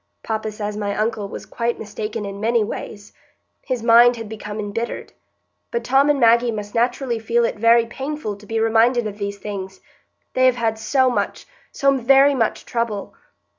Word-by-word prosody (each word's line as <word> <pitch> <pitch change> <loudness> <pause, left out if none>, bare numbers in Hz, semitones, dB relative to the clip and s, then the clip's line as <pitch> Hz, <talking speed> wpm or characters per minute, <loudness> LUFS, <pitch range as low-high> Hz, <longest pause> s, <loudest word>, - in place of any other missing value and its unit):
Papa 220 -1 -3
says 210 0 -5
my 205 -1 -2
uncle 215 -1 -1
was - - -8
quite 235 0 -2
mistaken 210 0 -5
in 200 0 -6
many 230 0 +2
ways; 205 -1 -7 0.5
his 255 -4 -3
mind 240 +1 +6
had 225 -2 -7
become 210 0 -7
embittered. 215 +3 -4 0.6
But 470 - -3
Tom 270 +3 +3
and 290 -1 +2
Maggie 235 0 +4
must 210 -2 -5
naturally 240 0 0
feel 235 +1 +1
it 215 - -3
very 230 +1 +5
painful 265 -2 -5
to 205 0 -16
be 225 0 -1
reminded 225 +2 +3
of 210 0 -6
these 200 0 -4
things. 190 -2 -7 0.5
They 255 0 +4
have 255 - +3
had 225 -2 -1
so 260 +3 +2
much, - - -2 0.3
so 275 0 +2
very 270 +3 +5
much 230 -5 -1
trouble. 230 -4 -3
230 Hz, 175 wpm, -21 LUFS, 210-245 Hz, 0.6 s, mind